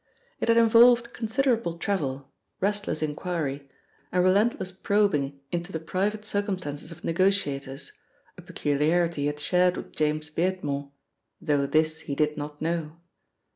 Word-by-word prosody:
It - - -1
had 230 0 +4
involved 235 +1 +6
considerable 230 -6 0
travel, 140 -8 -2 0.3
restless 205 -6 -1
inquiry 150 -3 -3 0.4
and 180 0 +2
relentless 190 0 +2
probing 185 -8 +1
into 175 +2 -3
the 160 - -3
private 200 +6 -2
circumstances 185 -8 -3
of 165 0 -12
negotiators, 165 -7 0 0.4
a - - -11
peculiarity 155 +3 0
he 145 - +1
had 145 0 -3
shared 180 +3 +2
with - - -8
James 155 +1 0
Beardmore, 150 -5 -2 0.5
though 145 -5 +1
this 155 +2 +2
he 140 -3 -5
did 150 0 +1
not 150 0 -6
know. 165 -1 -2
165 Hz, 135 wpm, -26 LUFS, 150-200 Hz, 0.5 s, involved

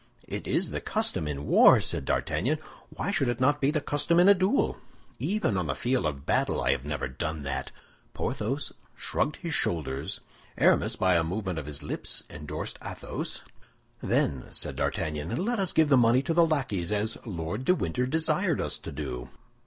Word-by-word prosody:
"It - - -5
is - - +1
the - - -3
custom 75 - -1
in 70 -1 -4
war," - - +7
said - - -3
D'Artagnan, 150 +5 0 0.3
"why 200 - -3
should 150 -10 +1
it 120 - -1
not 145 +3 +3
be 135 - +3
the 155 +1 +1
custom 145 +4 +1
in 180 - +6
a 200 - +10
duel?" 195 +7 +1 0.4
"Even 190 - 0
on 90 -3 -1
the 70 - -1
field 125 -8 +1
of 70 -2 -5
battle, - - +1
I - - +2
have 65 -1 -1
never 75 -2 -2
done 75 +4 -4
that." 70 - -3 0.4
Porthos 125 +5 -2 0.2
shrugged 150 - -1
his 170 -3 -4
shoulders; 70 -5 -1 0.4
Aramis - - +4
by 90 -2 +3
a 85 - +2
movement 95 0 -2
of 75 - -7
his 75 -1 -6
lips 75 - -2
endorsed 75 0 -5
Athos. - - -5 0.6
"Then," 65 -3 0
said - - 0
D'Artagnan, 75 +1 -2
"let 240 -1 0
us 190 -3 +3
give 160 -2 +3
the 135 - +6
money 120 +2 +4
to 165 - 0
the 170 0 +5
lackeys, 125 - -1
as 105 +2 -1
Lord 85 +2 -4
de 180 +7 +4
Winter 125 - -1
desired 160 +3 +1
us - - 0
to - - -7
do." 65 -4 -5
110 Hz, 185 wpm, -28 LUFS, -, 0.6 s, a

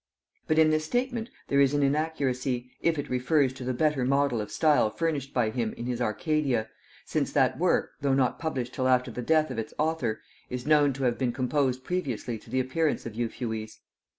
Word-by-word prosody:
But 155 - +2
in 160 -1 +6
this 155 0 +1
statement 245 +4 -1 0.2
there 140 0 +3
is 140 +1 +3
an 145 - +2
inaccuracy, 135 -4 -1
if 165 -2 +2
it 145 - -3
refers 130 +2 +2
to 130 - -8
the 130 - -1
better 145 +1 +1
model 135 -2 +2
of 105 - -7
style 150 -8 +3
furnished 140 +3 -2
by 115 -4 +1
him 115 -2 -2
in 120 - -7
his 125 -1 -2
Arcadia, 125 -1 0 0.4
since - - -1
that - - +2
work, - - +2
though 135 -1 +2
not 130 -2 +1
published 130 -6 -3
till 130 - 0
after 125 -1 +2
the 125 - -5
death 155 +2 +2
of 120 - -3
its 110 - -6
author, 155 -7 0 0.3
is 125 0 -5
known 150 -2 +4
to 135 +1 -5
have 120 -2 +1
been 130 -2 +1
composed 130 +1 0
previously 130 -10 -3
to - - -17
the 130 - 0
appearance 145 +5 0
of 115 - -5
Euphues. 110 -1 -4
130 Hz, 205 wpm, -28 LUFS, 125-155 Hz, 0.4 s, in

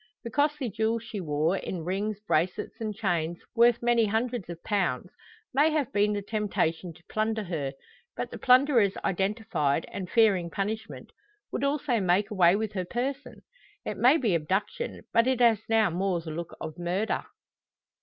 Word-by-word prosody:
The 235 - -6
costly 290 0 +1
jewels 220 +2 0
she 215 -3 -6
wore, 155 +3 0
in 175 -3 -5
rings, 200 +3 -2
bracelets, 180 +1 -1
and 215 -1 -2
chains, 175 -5 -1 0.2
worth 235 0 +4
many 235 -1 +4
hundreds 225 -1 -1
of 170 -1 -8
pounds, 185 - -1 0.4
may 290 +4 +4
have 300 -8 -1
been 205 +1 +2
the 205 -1 -3
temptation 190 -5 -1
to 175 - -20
plunder 220 0 -1
her; 155 -7 -3 0.4
but - - -4
the - - -7
plunderers 250 -6 +4
identified, 190 -6 0
and 185 -3 -5
fearing 200 -7 +3
punishment, 210 +5 -4 0.4
would 260 - -3
also 280 -4 +1
make 195 +3 +1
away 180 -3 +5
with 215 0 -2
her 185 -2 -2
person. 260 +8 -4 0.4
It - - -3
may 260 +6 +5
be 230 - +1
abduction, 190 - -2
but 230 +2 +4
it 260 -1 +1
has 230 -4 +5
now 220 -4 +3
more 185 +1 0
the 160 -1 -7
look 170 +2 -6
of 160 0 -7
murder. 180 +5 -1
210 Hz, 165 wpm, -28 LUFS, 175-230 Hz, 0.4 s, away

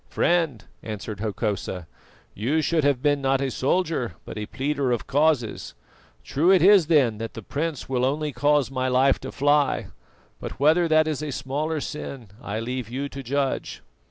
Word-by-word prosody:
"Friend," 165 -10 +1 0.2
answered 105 -1 -6
Hokosa, 105 -4 -3 0.5
"you 140 +10 0
should 160 -1 +1
have 140 -2 +1
been 145 -1 +2
not 135 0 +2
a 135 -1 -1
soldier 150 -2 0
but - - -8
a 105 -1 -5
pleader 140 -1 -1
of 120 - -1
causes. 145 -4 0 0.5
True 160 +6 +1
it 190 -2 +6
is 195 -4 +6
then 130 -10 +3
that 115 0 -6
the 115 - -7
prince 150 +4 -3
will 125 -2 0
only 150 +3 0
cause 145 -2 +2
my 130 -1 -1
life 130 +1 +3
to 130 - -7
fly, 145 0 +1 0.5
but - - -7
whether 160 +5 +4
that 155 0 +4
is 155 -2 -2
a 150 -1 -3
smaller 145 +5 -2
sin 140 -6 -6
I 105 +2 -4
leave 125 0 -4
you 135 +3 -3
to 135 - -7
judge." 135 +1 -2
140 Hz, 175 wpm, -24 LUFS, 125-150 Hz, 0.5 s, it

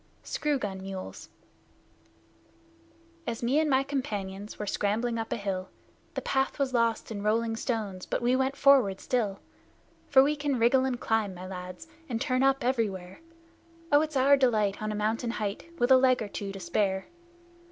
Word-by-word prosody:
SCREW 300 -2 -1
GUN 195 -6 -4
MULES 190 -1 -7 2.0
As 235 0 -3
me 260 +6 +3
and 315 -1 +1
my 265 -1 +3
companions 205 -7 -4
were 210 - -4
scrambling 225 +4 0
up 225 - -4
a - - +1
hill, 190 -3 -3 0.5
The - - -3
path 270 0 0
was 275 -2 -1
lost 230 -2 +1
in 205 -2 -4
rolling 225 +2 +1
stones, 215 -6 -3
but - - -1
we 245 +1 +2
went 265 +1 0
forward 265 -10 +4
still; 215 -6 -1 0.7
For 265 -2 +7
we 295 +2 +1
can 285 -2 -1
wriggle 245 +3 +4
and 250 -2 -2
climb, 215 -4 0
my 180 +1 -8
lads, 185 - -8 0.2
and 230 -2 -1
turn 255 -1 0
up 270 +1 +3
everywhere, 200 -8 -1 0.7
Oh, 290 0 +6
it's 310 -2 -2
our 275 +2 +6
delight 215 -7 +2
on 215 0 -2
a - - -3
mountain 220 +3 -1
height, 210 +9 -4
with 245 -3 +2
a 260 - +9
leg 255 -2 +3
or - - -5
two 200 0 -5
to 195 - -8
spare! 190 +2 0
230 Hz, 175 wpm, -28 LUFS, 200-265 Hz, 2.0 s, a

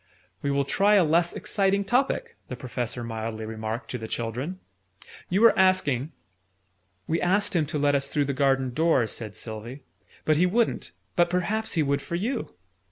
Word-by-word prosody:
"We 140 - -1
will 140 0 +1
try 200 +8 +3
a 195 - +6
less 170 +2 +3
exciting 200 -1 0
topic," 275 - 0
the 125 - -5
Professor 125 -1 -4
mildly 110 -1 -4
remarked 110 +2 -5
to 125 - -3
the 110 - -6
children. 125 - -4 0.7
"You 190 +4 +2
were 230 - +7
asking 165 -8 +2 0.5
" 95 -1 -39
"We 165 - 0
asked 195 +2 +1
him 155 -4 +2
to 155 +1 -3
let 145 0 +2
us 140 -1 +1
through 145 -1 0
the 140 - -1
garden 135 -2 +1
door," 160 -4 +3
said 110 -1 -5
Sylvie: 115 +5 -7 0.4
"but 155 -1 +3
he 180 +3 +4
wouldn't: 230 +5 0 0.2
but 175 0 +3
perhaps 205 +5 -1
he 160 - +2
would 140 0 0
for 170 - -4
you!" 225 - -3
145 Hz, 180 wpm, -26 LUFS, 120-185 Hz, 0.7 s, were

